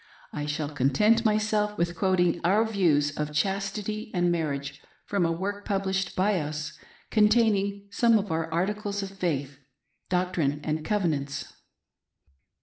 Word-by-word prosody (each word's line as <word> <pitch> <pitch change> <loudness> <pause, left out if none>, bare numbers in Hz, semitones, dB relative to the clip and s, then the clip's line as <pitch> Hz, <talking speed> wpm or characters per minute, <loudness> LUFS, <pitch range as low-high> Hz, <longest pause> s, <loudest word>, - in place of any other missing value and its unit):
I 150 0 -3
shall 150 0 -2
content 210 - +3
myself 210 -1 +1
with 170 0 0
quoting 175 -1 +2
our 205 +6 +3
views 165 -9 +2
of 150 0 -3
chastity 200 +6 -2
and 175 0 +2
marriage 140 -4 -3 0.2
from 195 -4 +1
a - - 0
work 200 +4 -3
published 195 -1 -1
iby 195 0 +3
us, 150 +1 -5 0.4
containing 210 -2 +3
some 230 +2 +4
of 205 -3 -3
our 160 0 -1
articles 200 +4 -1
of 195 - -6
faith 145 -8 -3 0.3
— - - -47
Doctrine 180 -6 0
andCovenants." 155 - -2
185 Hz, 135 wpm, -27 LUFS, 155-205 Hz, 0.4 s, some